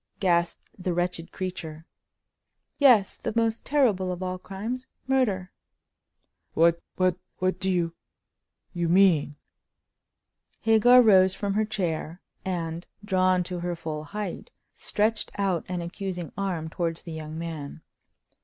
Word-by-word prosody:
gasped 170 -3 +1
the 180 -1 -1
wretched 175 -1 -2
creature. 165 -4 -5 0.9
"Yes—the 240 -8 +4
most 230 -1 +1
terrible 215 -11 +2
of 180 +1 -4
all 185 0 -3
crimes—murder!" 225 -1 -2 1.0
"What—what—what 180 +2 +1
do 190 - -1
you—you 170 0 -5
mean?" 170 -5 +4 1.3
Hagar 235 +3 +6
rose 190 -3 +6
from 200 0 -2
her 215 +1 +2
chair, 175 -5 -3 0.2
and, 170 -2 -3 0.2
drawn 185 -2 +3
to 180 0 -5
her 175 0 -2
full 155 -2 -5
height, 205 +2 -5 0.2
stretched 215 +1 -1
out 195 -4 0
an 180 -1 -2
accusing 175 -2 -5
arm 180 -5 -2
towards 165 0 -3
the 170 - -8
young 155 0 -6
man. 160 -2 -6
185 Hz, 110 wpm, -26 LUFS, 170-200 Hz, 1.3 s, Hagar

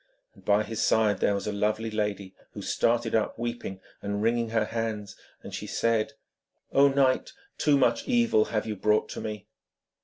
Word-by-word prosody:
And - - -20
by 105 +1 +3
his 110 0 -4
side 110 -2 +3
there 100 - +2
was 100 - -3
a 105 - -2
lovely 110 +2 -1
lady, 105 -3 -2 0.2
who - - -7
started 115 0 +1
up, 110 -1 +1
weeping 120 -5 -4 0.2
and 100 +1 -2
wringing 115 0 +1
her 110 -1 +1
hands, 110 -3 -4 0.3
and - - -9
she - - -5
said: 115 -2 0 0.6
'O 140 +1 +6
knight, 135 -2 +2 0.3
too 145 -2 +4
much 120 -3 +2
evil 235 - +3
have 110 -1 -2
you 110 - -3
brought 105 +2 +1
to - - -6
me!' 105 -2 -5
110 Hz, 180 wpm, -27 LUFS, 105-115 Hz, 0.6 s, O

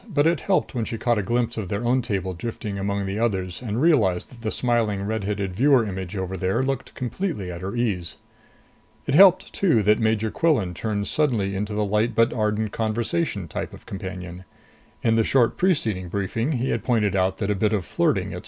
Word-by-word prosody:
But 145 -3 +2
it 165 -2 +3
helped 110 - 0
when 120 -3 -1
she 115 - -4
caught 120 -1 +1
a - - +1
glimpse 120 +3 -1
of 100 -5 -4
their 100 +3 -2
own 125 +2 +3
table 100 -6 -2
drifting 105 +2 -5
by 100 - -4
among 100 0 -1
the 95 +2 -3
others 95 -5 -1
and 115 -2 -3
realized 115 - +3
that 120 -2 -14
the 110 - -2
smiling 115 -5 0
red 110 0 -2
headed 100 -2 -2
viewer 130 +1 +4
image 95 -1 -5
over 95 0 -3
there 95 +6 0
looked 135 -1 -3
completely 125 - -3
at 85 0 -7
her 95 +4 -4
ease. 100 -8 -2 0.9
It 135 - -1
helped, 185 +3 +6
too, 160 - +2
that 105 +2 +4
Major 110 -1 +1
Quillan 135 - +1
turned 100 +1 -2
suddenly 110 -10 0
into 105 +2 -3
the 105 0 +1
light 105 +3 0
but 115 0 +3
ardent 105 -1 0
conversation 110 - -1
type - - -5
of - - -13
companion. 95 -2 -7 0.6
In 115 - +3
the 115 - +4
short 120 0 +3
preceding 110 - 0
briefing 105 - -1
he 130 0 -1
had - - -1
pointed 105 -6 +1
out 95 0 +1
that 105 -2 -1
a - - +3
bit 105 +2 +1
of 100 -5 -1
flirting, - - 0
etc. - - -5
110 Hz, 210 wpm, -24 LUFS, 95-120 Hz, 0.9 s, helped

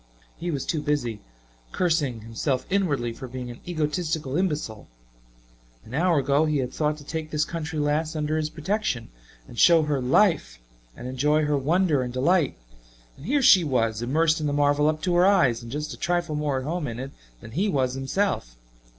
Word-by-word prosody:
He 175 - -5
was 140 -5 -2
too 155 - -1
busy 145 -7 -1 0.5
cursing 150 -10 0
himself 125 +4 -2
inwardly 145 -12 0
for 130 +2 -8
being 125 0 -6
an 120 - -11
egotistical 155 -3 -2
imbecile. 150 - -2 1.0
An 115 - -12
hour 170 +3 +2
ago 140 +2 +2
he 155 -1 +1
had 130 -2 -2
thought 150 -1 0
to 150 - -12
take 155 +1 -5
this 150 0 0
country 160 -1 -5
lass 150 +2 0
under 155 0 -1
his 155 -1 -1
protection 170 - -2 0.4
and 120 - -9
show 165 -2 +6
her 145 -3 -1
"life" 130 - +2 0.4
and 125 - -7
enjoy 150 +4 +1
her 150 0 +1
wonder 155 +1 +2
and 125 -1 -3
delight 145 +5 +1 0.6
and 140 - -11
here 280 +2 +2
she 185 -7 +7
was, 115 -6 0
immersed 155 +6 +2
in 150 - 0
the 145 - -1
marvel 145 +1 +3
up 155 0 -3
to 180 - +1
her 175 +2 +5
eyes, 155 -13 +3
and 115 -1 -9
just 150 +2 -4
a - - -10
trifle 175 -2 -1
more 150 -2 -1
at 130 - -3
home 165 0 -2
in 115 -2 -5
it 135 +1 -6 0.3
than 110 - -11
he 190 - 0
was 130 -6 0
himself. 135 - -1
150 Hz, 195 wpm, -25 LUFS, 130-165 Hz, 1.0 s, she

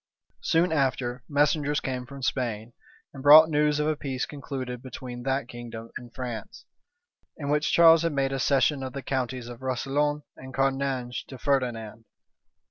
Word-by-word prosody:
Soon 165 +2 +2
after, 130 -4 0
messengers 145 0 +2
came 125 -1 -4
from 140 -1 -10
Spain, 120 -3 -2 0.4
and 135 - -9
brought 155 +3 +9
news 150 -1 +2
of 150 - +1
a 155 0 +1
peace 135 -3 -3
concluded 130 -4 -6
between 125 -1 -8
that 135 0 -1
kingdom 115 -2 -9
and 120 -1 -8
France, 120 -3 -7 0.7
in 140 -2 -4
which 150 0 +1
Charles 165 -1 +7
had 165 0 0
made 135 -2 0
a 135 - -2
cession 135 +2 +2
of 130 -1 -5
the 140 - -6
counties 130 -2 -3
of 120 0 -9
Roussillon 145 +3 -1
and 130 0 -10
Cerdagne 135 -2 0
to 130 - -9
Ferdinand. 120 -5 -2
135 Hz, 160 wpm, -26 LUFS, 125-145 Hz, 0.7 s, brought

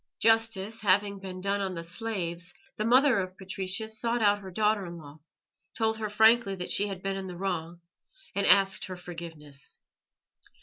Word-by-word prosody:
Justice 225 -1 +2
having 200 0 +2
been 185 -1 -7
done 200 +1 0
on 190 -2 -2
the 165 - -5
slaves, 180 -2 -4 0.2
the 215 - -2
mother 255 0 +5
of 185 0 -4
Patricius 195 +3 -3
sought 235 0 +1
out 205 0 +4
her 190 -2 -9
daughter 210 +2 +1
in 170 0 -8
law, 150 -1 -12 0.6
told 220 -1 0
her 215 -1 -2
frankly 220 0 +4
that 180 -1 -5
she 205 - +2
had 195 -2 -6
been 195 0 -1
in 195 -1 -5
the 180 -1 -7
wrong, 175 -2 -3 0.5
and 200 - 0
asked 195 -1 +4
her 185 -1 -7
forgiveness. 165 -5 -10
195 Hz, 175 wpm, -28 LUFS, 180-215 Hz, 0.6 s, mother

